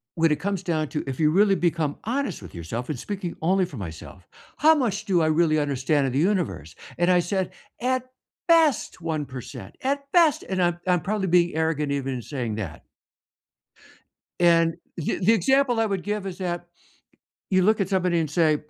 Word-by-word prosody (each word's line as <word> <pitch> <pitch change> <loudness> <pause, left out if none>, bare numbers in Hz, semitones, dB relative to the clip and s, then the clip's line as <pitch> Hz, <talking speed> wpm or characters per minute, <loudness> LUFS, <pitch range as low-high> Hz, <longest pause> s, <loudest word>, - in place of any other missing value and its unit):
"When 165 -1 +3
it 150 - +1
comes 195 +1 -2
down 155 -4 -1
to, 150 - -3
if 135 +3 -4
you 155 0 +4
really 195 +2 +4
become 165 -4 0
honest 245 - -2
with 90 - -11
yourself 110 - -5
and 145 - -3
speaking 190 - -5
only 185 +3 +2
for 145 -8 -10
myself, 90 0 -9 0.3
how 315 +2 +6
much 235 -9 -1
do 180 -4 +2
I 155 - +2
really 155 0 +3
understand 140 0 +1
of 130 - -1
the 140 - +1
universe?" 170 - -1 0.2
and 175 +1 +2
I 180 -1 +5
said, 185 +1 -2 0.3
"At 255 +1 -1 0.4
best, 325 - +3
1%." 150 -6 -6
At 280 +1 -2
best, 330 -6 +4
and 185 -1 -2
I'm 175 0 +1
I'm 180 -1 +3
probably 195 +1 -1
being 175 -1 +3
arrogant 155 -3 0
even 135 -1 -2
in 125 - -5
saying 120 -5 -4
that. 90 -9 -6 1.6
And 165 -1 +4 0.2
the 165 - -2
the 200 +5 +4
example 250 +4 +3
I 225 - +2
would 195 -4 -2
give 205 -1 -3
is 190 -1 -6
that 175 -2 -3 0.8
you 185 -1 +4
look 215 +2 +3
at 190 - 0
somebody 180 -3 +1
and 155 -3 -1
say, 155 -1 +3
175 Hz, 190 wpm, -24 LUFS, 150-200 Hz, 1.6 s, how